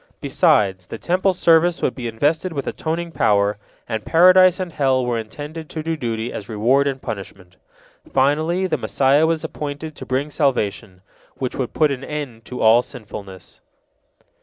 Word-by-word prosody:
Besides, 95 -3 +2
the - - -7
Temple 185 - +1
service 170 0 +3
would - - +1
be 125 -3 -5
invested 150 +10 0
with 140 -3 -4
atoning 170 +1 -3
power, 100 -6 +1 0.3
and 110 -2 -3
Paradise 185 +2 +6
and 180 -3 -4
hell 130 -3 +1
were 120 -1 -1
intended 150 +8 -8
to 155 - -5
do 165 +1 -1
duty 115 -4 -3
as 100 - -7
reward 125 +6 +2
and 135 -1 -2
punishment. 95 -5 -8 0.6
Finally, 155 +7 +1
the 180 - -1
Messiah 140 +3 +2
was 165 -1 -1
appointed 150 +1 -6
to - - -9
bring 135 +3 -1
salvation, 105 - -1 0.3
which 130 -2 -4
would 130 -3 -3
put 155 -2 +2
an 135 -1 -4
end 135 -7 -6
to 125 - -6
all 110 +2 +6
sinfulness. 100 -6 -10
135 Hz, 160 wpm, -21 LUFS, 110-160 Hz, 0.6 s, Paradise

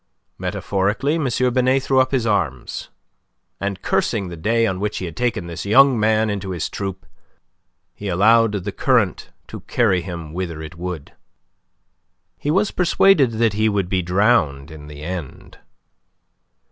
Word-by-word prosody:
Metaphorically, 100 +9 -1
M. 125 -1 +1
Binet 130 +1 +2
threw 135 -1 +2
up 130 0 +3
his 130 -4 0
arms, 85 - -2 0.7
and 100 -2 -4
cursing 95 -3 0
the 85 - -7
day 115 +7 +1
on 95 -4 -2
which 105 +1 -2
he 95 - -4
had 85 -3 -7
taken 120 -6 -1
this 85 -1 -6
young 130 +4 +5
man 110 +1 +2
into 100 -2 -3
his 85 -4 -3
troupe, 95 -4 -5 0.9
he 105 - -7
allowed 110 +4 +4
the 100 0 -3
current - - +1 0.2
to - - -9
carry 100 -7 +1
him 85 -3 -7
whither 85 -3 -4
it 80 +2 -8
would. 85 -3 -6 1.3
He 145 - -3
was 195 +6 +2
persuaded 175 -7 +3
that 110 -1 +1
he 110 +1 +2
would 100 -3 -1
be 95 -1 +1
drowned 90 - +1
in 75 -2 -11
the 75 0 -10
end. 85 -5 -7
100 Hz, 155 wpm, -21 LUFS, 85-115 Hz, 1.3 s, young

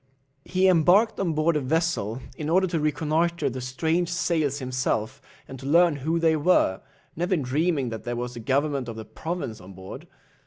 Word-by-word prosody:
He 185 +1 +2
embarked 185 +5 +4
on 175 -4 0
board 155 +2 +1
a 150 - +1
vessel, 130 -6 -1
in 150 +1 -4
order 185 +3 +4
to 170 -3 -1
reconnoitre 155 0 0
the 130 +1 -5
strange 160 +7 -1
sails 160 -5 0
himself, 130 -1 -2 0.3
and 135 - -9
to 135 - -7
learn 170 0 +4
who 160 +5 -1
they 165 -1 +3
were, 150 - +2 0.3
never 175 +3 0
dreaming 145 0 0
that 110 -1 -6
there 120 0 -3
was 120 +1 -4
the 120 - -8
governor 135 +1 0
of 115 - -7
a 110 - -7
province 130 -1 -5
on 95 +2 -12
board. 95 +1 -10
150 Hz, 185 wpm, -25 LUFS, 125-170 Hz, 0.3 s, embarked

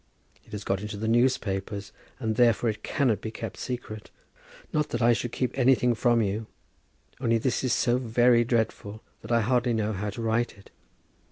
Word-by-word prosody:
It - - -20
has 105 -1 -5
got 95 0 -1
into 105 0 -5
the 110 +2 -3
newspapers, 105 -4 0 0.3
and 110 -3 -1
therefore 120 -1 +3
it 105 - -10
cannot 120 -8 0
be 110 - -4
kept 110 - -6
secret. 120 -4 -6 0.6
Not 150 -1 +1
that 120 - -2
I 120 0 +6
should 120 0 -3
keep 125 0 -2
anything 125 -2 +3
from 120 0 +2
you; 105 +2 -2 0.7
only 115 -3 +2
this 125 +3 -1
is 130 - 0
so 120 +2 +2
very 120 0 +4
dreadful 110 -2 -2 0.2
that - - -8
I 115 0 +4
hardly 120 +2 +1
know 110 -1 0
how 105 +2 -3
to 105 - -6
write 115 0 0
it. 100 - -18
115 Hz, 185 wpm, -27 LUFS, 105-120 Hz, 0.7 s, I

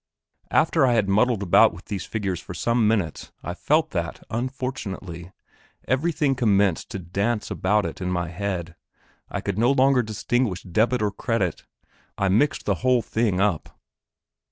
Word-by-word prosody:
After 160 -1 +3
I 125 -2 +4
had 110 -4 +2
muddled 110 +2 +2
about 85 -2 +5
with 90 - -13
these 100 -2 -4
figures 100 -5 -3
for 90 - -9
some 115 +4 +1
minutes 100 -8 -1
I - - -4
felt - - +1
that, - - -3
unfortunately, 110 -8 -4 0.6
everything 145 +2 +1
commenced 100 -7 +2
to - - -5
dance 100 +5 -2
about 95 -2 0
in 90 - -2
my 90 -2 -1
head; 90 -2 -4 0.5
I - - -3
could 100 0 -3
no 120 +3 +4
longer 135 -1 +4
distinguish 110 -2 -1
debit 110 +6 +1
or 105 - +1
credit; 100 -3 -2 0.5
I 100 - +1
mixed 140 +11 +2
the - - +1
whole 125 -2 +3
thing 110 -4 0
up. 100 -5 -1
105 Hz, 155 wpm, -24 LUFS, 95-125 Hz, 0.6 s, about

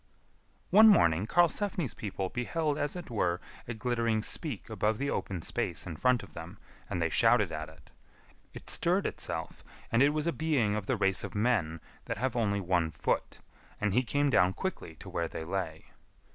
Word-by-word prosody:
One 215 +4 +8
morning 95 - +4
Karlsefni's 175 - +2
people 95 -2 -4
beheld 150 - -1
as 145 +3 -1
it 175 -7 -7
were 90 -6 0 0.3
a 120 - -4
glittering 115 -2 0
speak 140 - -2
above 110 -1 0
the 140 +3 -1
open 90 -4 -3
space - - -2
in 85 - -6
front 125 +5 +2
of 90 -6 -13
them, 85 +5 -9 0.3
and 90 - -2
they 80 - +2
shouted - - +4
at 80 +1 -5
it. 80 - -18 0.6
It - - -11
stirred 180 +3 +1
itself, - - -4 0.3
and 115 - +3
it 140 - +6
was 150 +1 -1
a 170 - +1
being 145 -10 +1
of 105 -2 -3
the - - +1
race 95 -1 +2
of - - -7
men 105 -8 +1 0.2
that - - -3
have 125 +2 -1
only 100 -4 +1
one 90 -3 +1
foot, - - -2 0.4
and 105 -2 0
he 125 - +4
came 145 +3 +1
down 90 -4 +4
quickly 190 - -5
to 95 - -12
where 85 -2 -2
they 80 - -6
lay. 80 -2 -4
110 Hz, 185 wpm, -30 LUFS, 90-140 Hz, 0.6 s, One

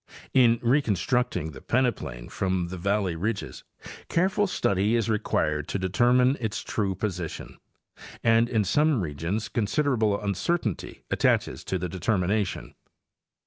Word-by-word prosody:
In 120 -3 +5
reconstruct 125 - +1
ing 80 -2 -4
the 65 - -11
peneplain 80 - -1
from 95 -2 -1
the 95 - -6
valley 100 -1 0
ridges, 90 - -3 0.5
careful 190 +4 +2
study 100 - +1
is 115 -1 +1
required 75 -7 0
to - - -2
determine 125 +8 +3
its 110 -4 -3
true 100 -3 -1
position, 90 -4 -5 0.6
and 115 +1 +4
in 110 -4 +2
some 145 - +2
regions 85 +7 -3
considerable 115 -3 +1
uncertainty 105 - -2
attaches - - +1
to 95 - -1
the 90 0 -3
determination. 95 +2 -1
105 Hz, 125 wpm, -26 LUFS, 90-120 Hz, 0.6 s, In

